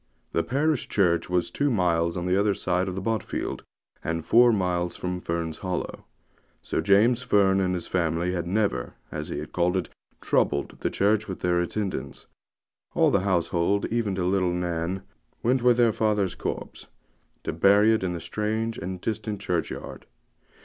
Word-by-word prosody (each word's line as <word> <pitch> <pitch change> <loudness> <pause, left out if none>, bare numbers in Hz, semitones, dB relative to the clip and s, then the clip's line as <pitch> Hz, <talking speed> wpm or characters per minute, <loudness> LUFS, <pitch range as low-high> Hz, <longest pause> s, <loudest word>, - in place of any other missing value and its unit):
The 85 - +1
parish 145 - 0
church 90 -5 +2
was 90 -1 0
two 145 0 +1
miles 85 -6 +1
on 90 - -3
the 90 0 +2
other 100 0 +2
side 90 +1 0
of 95 0 -4
Botfield, 115 0 -2 0.4
and 85 0 -2
four 120 +1 +6
miles 90 -4 0
from 90 0 -3
Fern's 85 -2 -3
Hollow; 90 -2 -4 0.5
so - - -2
James 110 +5 +4
Fern 100 -5 +3
and 90 -1 +1
his 90 - -4
family 85 0 0
had 85 -2 -2
never, 95 - -1 0.2
as 75 0 -5
he 75 +1 -4
called 90 +3 0
it, 90 - -3 0.3
'troubled' 70 0 0
the - - -1
church 105 +2 +1
with 95 - -6
their 90 -1 +2
attendance. 95 +2 -4 0.7
All - - +4
the - - +3
household, 95 +1 +1
even 115 -4 0
to 90 -2 -1
little 90 -1 +2
Nan, 90 +1 -2 0.4
went 125 +2 +2
with 120 -1 +4
their 120 -2 +4
father's 105 -3 +1
corpse, - - -5 0.6
to - - -3
bury 100 +6 +5
it 110 - 0
in 90 -1 -1
the 85 - -4
strange 110 +5 -2
and 90 +2 -5
distant 110 0 -3
churchyard. 90 -4 -4
95 Hz, 165 wpm, -26 LUFS, 85-105 Hz, 0.7 s, four